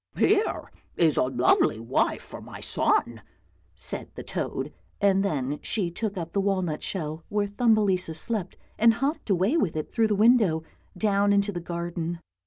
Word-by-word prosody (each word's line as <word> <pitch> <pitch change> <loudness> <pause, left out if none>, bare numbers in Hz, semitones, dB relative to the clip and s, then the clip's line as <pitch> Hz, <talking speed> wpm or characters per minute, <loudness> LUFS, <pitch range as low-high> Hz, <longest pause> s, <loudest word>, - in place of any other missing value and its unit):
" - - -23
Here 420 +1 +1 0.3
is 160 -4 +3
a - - +3
lovely 125 -3 +2
wife 115 +3 0
for - - -10
my - - -10
son," - - +1 0.5
said - - -5
the - - -7
toad, - - -4 0.3
and 195 -1 +3
then 145 -6 -1
she 185 -6 -1
took 205 +2 -3
up 170 -2 -4
the 200 - +2
walnut 185 -6 -1
shell 160 -3 -4
where 205 0 +1
Thumbelisa 205 -5 +2
slept 190 +2 -1 0.2
and 230 +1 +6
hopped 275 +1 -2
away 195 - +2
with 185 - 0
it 155 - -4
through 225 -1 +3
the 210 - +1
window, 210 -7 +4 0.3
down 205 -1 +2
into 200 0 +2
the 175 -3 -5
garden. 170 0 -4
195 Hz, 170 wpm, -26 LUFS, 165-210 Hz, 0.5 s, and